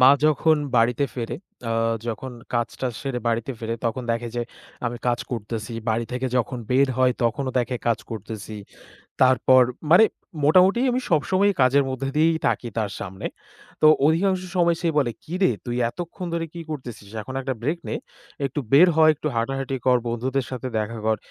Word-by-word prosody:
মা 130 +1 +9 0.2
যখন 155 +1 +3 0.2
বাড়িতে 120 +4 +3
ফেরে, 120 0 -4 0.3
আ - - +1 0.3
যখন 120 +3 -4 0.2
কাজ-টাজ 120 +2 -1
সেরে 135 -3 -2
বাড়িতে 115 +3 -1
ফেরে, 115 0 -3
তখন 115 +3 -1
দেখে 115 +1 -1
যে 120 - 0 0.4
আমি 120 0 -3
কাজ 120 -1 +2
করতেছি। 115 0 -4 0.2
বাড়ি 115 +2 0
থেকে 125 +1 -1
যখন 125 +1 -1
বের 135 +2 +4
হয় 130 -1 +4
তখনও 130 +3 0
দেখে 125 +1 -1
কাজ 115 -2 +2
করতেছি। 110 0 -6 0.7
তারপর, 130 0 +6 0.3
মানে 180 +6 +9 0.4
মোটামুটি 185 +8 +5
আমি 250 - +1
সবসময়ই 185 +5 +2
কাজের 135 +2 +5
মধ্য 130 0 -4
দিয়েই 160 +1 +3
থাকি 120 - -1
তার 105 -3 -1
সামনে। 95 -1 -7 0.6
তো 155 - +7 0.2
অধিকাংশ 185 +4 +2 0.2
সময় 170 -1 +3
সে 170 - 0
বলে, 125 -5 +2
"কিরে 180 -1 +1
তুই 120 - -3
এতক্ষণ 175 +6 -7
ধরে 165 -1 -1
কি 170 - -6
করতেছিস? 120 -9 -7
এখন 130 +5 -8
একটা 130 0 -2
ব্রেক 155 +7 -1
নে, - - -2 0.5
একটু 135 +2 -2
বের 165 +7 +8
হ, 160 - +2
একটু 155 +1 -4
হাঁটাহাঁটি 135 +3 -1
কর, 125 -1 +5
বন্ধুদের 125 +3 -1
সাথে 130 0 -4
দেখা 115 +2 -3
কর। 110 0 +2
130 Hz, 170 wpm, -24 LUFS, 115-155 Hz, 0.7 s, মা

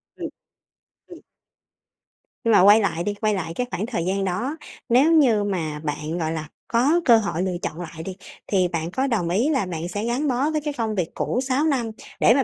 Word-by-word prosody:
Ừm. - - -5 0.8
Ừm. - - -12 1.2
Nhưng 230 - +2
mà 205 - +6
quay 205 +3 +8
lại 170 -4 -1
đi, 205 - -1
quay 215 +1 0
lại 165 -4 -3
cái 245 +4 -2
khoảng 205 - -2
thời 195 -9 -3
gian 195 +1 0
đó, 235 - -2 0.3
nếu 270 +7 +5
như 245 -10 +4
mà 160 -7 -2
bạn, 150 +2 -3
gọi 160 -1 -1
là, 155 -1 -4 0.2
có 280 +9 +3
cơ 235 -3 +7
hội 200 -5 -1
lựa 180 -2 -1
chọn 165 +3 -4
lại 165 -1 -7
đi 185 0 -6 0.3
thì 185 -3 +2
bạn 165 -1 -3
có 265 +6 0
đồng 205 -9 0
ý 225 - +2
là 265 -10 +1
bạn 170 -1 -4
sẽ 205 +5 -3
gắn 255 +6 0
bó 265 +4 +1
với 305 -1 -1
cái 295 -1 -3
phông 220 -2 -1
việc 180 -3 -1
cũ 250 - -1
6 270 +3 +1
năm 250 -7 0 0.3
để 230 - +6
mà 270 0 +3
205 Hz, 220 wpm, -23 LUFS, 175-250 Hz, 1.2 s, quay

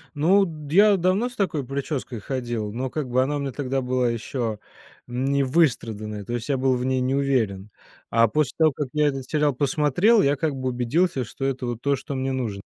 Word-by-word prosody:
Ну, 190 +7 +4 0.2
я 200 +4 +6
давно 185 +7 +1
с 245 - -14
такой 160 -9 -1
причёской 135 -3 -4
ходил, 120 -4 -3
но 130 +2 -3
как 145 -3 -4
бы 130 +1 +3
она 145 +2 -1
мне 140 -1 -3
тогда 135 -1 -2
была 125 -1 0
еще 115 -2 -3 0.5
не 135 +3 0
выстраданной, 110 - 0
то 120 - -5
есть 120 +3 -4
я 135 - +2
был 130 0 +2
в 125 - -2
ней 130 0 +1
не 130 +2 0
уверен, 110 -8 0 0.4
а 115 0 +4
после 150 +2 0
того, 155 -3 +4
как 145 0 -3
я 150 -1 +2
этот 135 -2 -2
сериал 150 -2 +2
посмотрел, 150 - +3
я 140 +1 +3
как 150 +1 -1
бы 130 -1 -3
убедился, 130 +4 0
что 135 +4 -6
это 130 -2 -2
вот 120 -1 -4
то, 140 0 +2
что 140 +1 -6
мне 130 0 -1
нужно. 110 -7 -3
135 Hz, 205 wpm, -24 LUFS, 120-150 Hz, 0.5 s, я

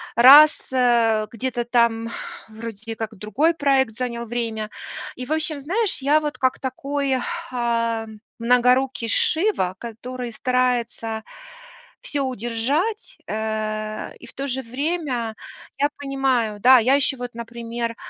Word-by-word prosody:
раз, 285 +5 +8
э, 235 -4 +3
где-то 240 +1 -2
там 235 -1 +2 0.4
вроде 225 0 -7
как 225 0 -5
другой 250 - +1
проект 275 -6 +2
занял 235 0 -4
время. 225 -2 -3 0.4
И, 250 0 -7
в - - -8
общем, 315 -1 +1
знаешь, 385 +9 -1
я 290 +3 +4
вот 300 -1 -4
как 260 -1 +2
такой, 275 0 -1 0.3
э, 230 -2 0 0.3
многорукий 250 +1 +2
Шива, 315 - +1
который 240 +1 -6
старается 240 -3 -1 0.8
всё 290 - -2
удержать, 265 - -2
э, 215 0 -3
и - - -13
в - - -13
то 275 +1 -4
же 265 0 -2
время 255 -3 -2 0.4
я 285 +1 +2
понимаю, 265 -6 0
да, 255 +4 +7
я 255 +4 +4
еще 280 -1 +1
вот, 245 -1 -7
например, 235 0 -5
245 Hz, 125 wpm, -22 LUFS, 230-270 Hz, 0.8 s, раз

